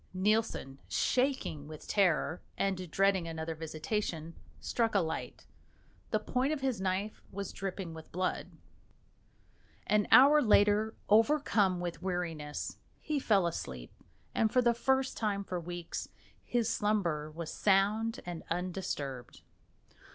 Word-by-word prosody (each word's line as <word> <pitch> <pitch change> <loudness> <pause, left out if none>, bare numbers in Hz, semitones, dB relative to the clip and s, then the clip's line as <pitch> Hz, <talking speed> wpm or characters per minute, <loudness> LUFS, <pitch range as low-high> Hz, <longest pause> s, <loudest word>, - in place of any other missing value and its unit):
Nielsen, 190 -9 0
shaking 250 - 0
with 155 -1 -10
terror 175 -4 +2 0.2
and 185 -3 -1
dreading 195 0 +2
another 160 0 -4
visitation, 160 +1 -3 0.3
struck 230 -3 0
a - - +6
light. 160 -3 -4 0.6
The - - +2
point 260 +3 0
of 305 -3 -2
his 260 -7 -1
knife 190 +3 -2
was 200 0 -5
dripping 190 -3 -4
with 160 -1 -11
blood. 185 +1 -1 1.4
An 210 -1 +2
hour 290 +4 +8
later, 210 -1 +4
overcome 215 -5 +3
with 175 -1 -4
weariness, 170 -5 -3 0.2
he 305 -2 -1
fell 200 -8 +3
asleep, 65 - -5 0.4
and 220 -1 +2
for 250 - +3
the 240 0 +4
first 265 +2 +1
time 205 -3 -1
for 180 -2 -3
weeks 175 0 -5 0.3
his 240 -2 0
slumber 175 -8 0
was 160 +1 -6
sound 210 +3 +2
and 175 -2 -5
undisturbed. 165 -8 -4
190 Hz, 125 wpm, -32 LUFS, 165-220 Hz, 1.4 s, hour